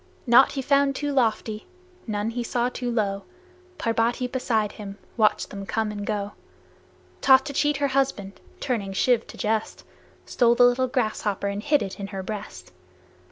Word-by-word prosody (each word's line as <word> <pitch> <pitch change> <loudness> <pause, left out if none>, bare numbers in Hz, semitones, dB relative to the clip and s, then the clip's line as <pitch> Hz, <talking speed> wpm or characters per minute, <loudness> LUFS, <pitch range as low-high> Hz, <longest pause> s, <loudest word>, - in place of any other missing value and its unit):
Naught 240 +2 +6
he 270 -2 -3
found 280 0 +3
too 290 +1 -2
lofty, 220 -4 0 0.4
none 210 +1 -2
he 240 +1 -3
saw 240 +1 0
too 250 -1 -4
low 200 -4 -1 0.6
Parbati 230 +2 0
beside 235 -4 -1
him 200 -1 -9 0.2
watched 215 -2 +2
them 200 -1 -6
come 220 -1 -1
and 205 -1 -6
go; 205 -1 -2 0.9
Thought 265 -1 +6
to 285 - -5
cheat 295 +1 +1
her 285 -1 0
husband, 260 -8 -1 0.2
turning 210 -7 -2
Shiv 235 +3 +2
to - - -11
jest 220 -1 -2 0.4
Stole 235 -1 +3
the 245 - +5
little 250 +1 +3
grasshopper 215 -5 -1
and 200 +1 -2
hid 290 +4 +2
it 195 - -7
in 200 - -4
her 195 -2 -6
breast. 185 - -7
230 Hz, 165 wpm, -25 LUFS, 205-255 Hz, 0.9 s, Naught